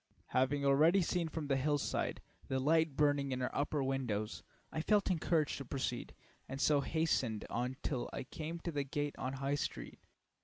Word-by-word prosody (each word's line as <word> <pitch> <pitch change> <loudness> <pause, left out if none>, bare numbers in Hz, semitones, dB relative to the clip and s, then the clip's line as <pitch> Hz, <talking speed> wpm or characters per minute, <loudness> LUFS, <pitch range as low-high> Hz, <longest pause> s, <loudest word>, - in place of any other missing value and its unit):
Having 140 +2 +2
already 155 +7 +5
seen 170 0 0
from 155 -1 -4
the 140 -1 +2
hillside 145 +1 0 0.3
the 130 - 0
light 160 +1 +3
burning 145 -1 +2
in 130 - -1
her 125 - -2
upper 145 0 0
windows, 120 -6 -1 0.3
I 160 - -2
felt 205 +2 +3
encouraged 160 -4 +1
to 140 - -6
proceed, 125 -2 -3 0.3
and 135 +1 -4
so 145 0 +4
hastened 140 -9 0
on 125 +2 -1
till 130 -4 -1
I 135 - -4
came 155 +5 -5
to 170 - -3
the 145 -2 -1
gate 145 +1 -2
on 130 0 -2
High 135 +1 -1
Street. 145 - -3
140 Hz, 180 wpm, -35 LUFS, 130-155 Hz, 0.3 s, already